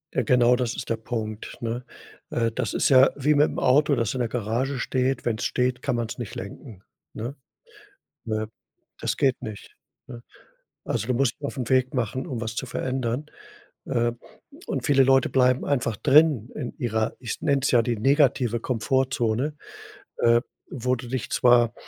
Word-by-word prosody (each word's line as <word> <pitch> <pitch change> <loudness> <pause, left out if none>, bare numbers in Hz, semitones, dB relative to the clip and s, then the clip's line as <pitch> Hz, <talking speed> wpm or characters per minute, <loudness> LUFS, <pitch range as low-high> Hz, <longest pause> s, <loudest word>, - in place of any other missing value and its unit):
Genau 125 -1 +4
das 120 -2 -2
ist - - -6
der 115 - 0
Punkt, 110 -1 -5
ne? 120 +1 -3 0.5
Äh, 115 -1 0
das 115 -2 -3
ist - - +2
ja 130 0 +7
wie 145 +2 +2
mit 145 +1 +5
dem - - -4
Auto, 145 +3 +4
das 115 -3 -1
in 130 - -4
der 120 -2 0
Garage 120 +4 -2
steht, 130 +1 -1
wenn 115 -2 0
es - - -3
steht, 125 0 0
kann 135 -2 -1
man 120 -1 -1
es - - -7
nicht 120 -4 -6
lenken, 100 +1 -9 0.3
ne? 120 +6 -5 0.9
Weil, 110 -1 -2 0.5
das - - -2
geht 135 -2 +1
nicht. 110 -2 -9 0.3
Ne, 120 -2 -9 0.7
also, 110 -2 -2
du 125 - 0
musst 125 -1 +1
dich - - -25
auf 140 - -6
'n 125 -3 -3
Weg 130 0 +2
machen, 125 +1 -2
um 130 -8 -4
was 110 -1 -4
zu 130 - -3
verändern. 130 +1 -2 0.6
Äh, 120 0 +1 0.5
und - - -3
viele 140 -3 +5
Leute 135 0 +4
bleiben 125 -1 +2
einfach 120 -6 0
drin 145 -3 +4
in 125 - -5
ihrer, 110 -2 -1
ich 120 -3 -5
nenne 140 -1 +2
es 140 - +2
ja 120 -2 +5
die 120 0 -1
negative 130 -2 +2
Komfortzone, 130 +2 0 0.6
äh, 120 0 +4 0.3
wo 125 0 0
du 120 +1 -8
dich 130 0 -3
zwar 120 -2 +4
125 Hz, 180 wpm, -25 LUFS, 115-130 Hz, 0.9 s, ja